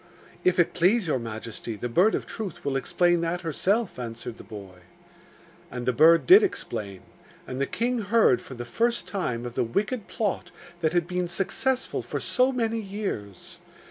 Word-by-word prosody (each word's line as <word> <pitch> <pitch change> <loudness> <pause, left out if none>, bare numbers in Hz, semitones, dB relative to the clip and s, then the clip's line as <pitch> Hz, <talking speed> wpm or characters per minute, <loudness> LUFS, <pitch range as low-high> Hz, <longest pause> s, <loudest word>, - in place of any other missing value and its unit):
'If 180 0 +3
it 175 -2 +3
please 185 +5 +3
your 150 -5 0
majesty, 115 0 -6
the 120 - -4
Bird 180 - +3
of - - -3
Truth 205 -10 -6
will 140 -1 0
explain 175 +5 +2
that 170 +1 -1
herself,' 185 - 0
answered 115 -1 -6
the - - -9
boy. 100 -4 -10 0.9
And 125 -1 -5
the 125 - +2
bird 165 +6 +6
did 380 +4 +9
explain; 105 - -3 0.4
and 130 +1 -5
the 140 - +1
king 245 +1 -1
heard 205 - +3
for 130 - -10
the 120 0 -6
first 235 - 0
time 125 - -2
of 120 - -5
the - - +1
wicked 205 - -2
plot 210 -4 -2 0.3
that 160 -1 0
had 175 -2 +2
been 180 0 -2
successful 250 +9 -1
for - - -4
so 255 0 +2
many 230 -3 -1
years. 195 - -6
175 Hz, 175 wpm, -26 LUFS, -, 0.9 s, did